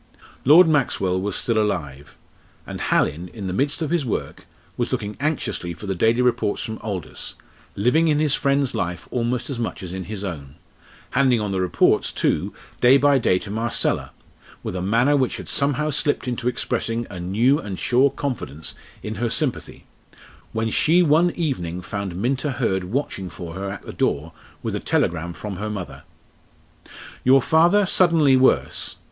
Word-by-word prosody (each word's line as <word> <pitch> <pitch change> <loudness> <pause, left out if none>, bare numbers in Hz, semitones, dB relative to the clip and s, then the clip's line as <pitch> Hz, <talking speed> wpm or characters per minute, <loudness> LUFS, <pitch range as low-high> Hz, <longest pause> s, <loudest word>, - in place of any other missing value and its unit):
Lord 165 +6 +8
Maxwell 100 - +1
was 100 0 -2
still 115 -2 +1
alive, 75 -9 -3 0.5
and - - -7
Hallin, 85 +5 +1
in 105 -3 -6
the 90 - -3
midst 145 - 0
of 155 - -3
his 170 -4 +1
work, 120 - -4 0.3
was 120 - -2
looking 105 -5 -3
anxiously 130 - -2
for 105 - -10
the 95 - -1
daily 115 +6 +2
reports 125 -4 0
from 110 -2 -5
Aldous, 100 -6 -6 0.4
living 125 +11 +3
in 150 -2 +3
his 150 -2 +2
friend's 140 -2 +1
life 85 0 -3
almost 120 +2 -1
as 125 - -4
much 115 - -4
as 90 -1 -6
in 95 -1 -5
his 105 -1 -5
own 75 -8 -6 0.6
handing 130 -4 +3
on 105 -2 -2
the 95 -1 0
reports, 90 -2 +2
too, 95 +7 0 0.3
day 125 +2 +6
by 140 0 +4
day 90 -6 +2
to 100 - -6
Marcella, 115 +2 -1 0.5
with - - -4
a 90 - -2
manner 115 +9 +3
which 130 -3 0
had - - -9
somehow 145 +2 0
slipped 145 -1 0
into 125 0 -2
expressing 120 -1 -1
a 90 - -7
new 115 - +2
and 100 -3 -6
sure 130 +7 +3
confidence 120 - -4 0.3
in 110 - -4
her 120 - +1
sympathy 135 +1 -2 0.7
when 110 0 -1
she 170 +9 +4
one 165 +2 +4
evening 90 - -2
found 95 +1 -5
Minta 130 - -1
Hurd 95 -7 -1
watching 95 -4 -3
for 85 -2 -8
her 95 +2 -4
at 100 - -7
the - - -8
door 80 +3 -1 0.3
with - - -2
a - - -1
telegram 85 0 0
from 100 +1 -6
her 105 +3 -4
mother: 85 -10 -6 1.2
"Your 130 +2 +6
father 170 +9 +4
suddenly 165 -7 +4
worse. 130 0 +2
115 Hz, 175 wpm, -22 LUFS, 95-140 Hz, 1.2 s, Lord